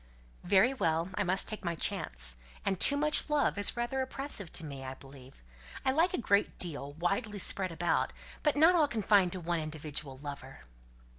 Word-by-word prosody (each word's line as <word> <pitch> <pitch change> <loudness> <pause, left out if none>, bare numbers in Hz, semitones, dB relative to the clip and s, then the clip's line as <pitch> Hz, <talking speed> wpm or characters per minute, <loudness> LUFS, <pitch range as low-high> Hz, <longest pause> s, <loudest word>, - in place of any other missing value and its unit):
"Very 195 +7 +4
well. 165 -7 0
I - - 0
must 185 +2 0
take 215 -1 -4
my 170 -1 -2
chance. - - -1 0.3
And 190 -2 0
too 285 - +6
much 300 +1 +2
love 295 -1 +2
is 205 - +2
rather 240 +3 -1
oppressive 260 - -4
to 165 - +2
me, 140 -3 -7
I 130 0 -6
believe. 135 - -15 0.4
I 265 - +4
like 335 +7 +2
a - - -2
great 205 -4 +1
deal, 145 -5 -3
widely 195 +6 -2
spread 190 -1 0
about; 175 +1 0 0.4
not 320 +5 +6
all 320 -4 +4
confined 205 -6 +3
to 185 - -4
one 170 0 -1
individual 150 -3 -5
lover." 140 -2 -9
180 Hz, 175 wpm, -31 LUFS, 150-240 Hz, 0.4 s, too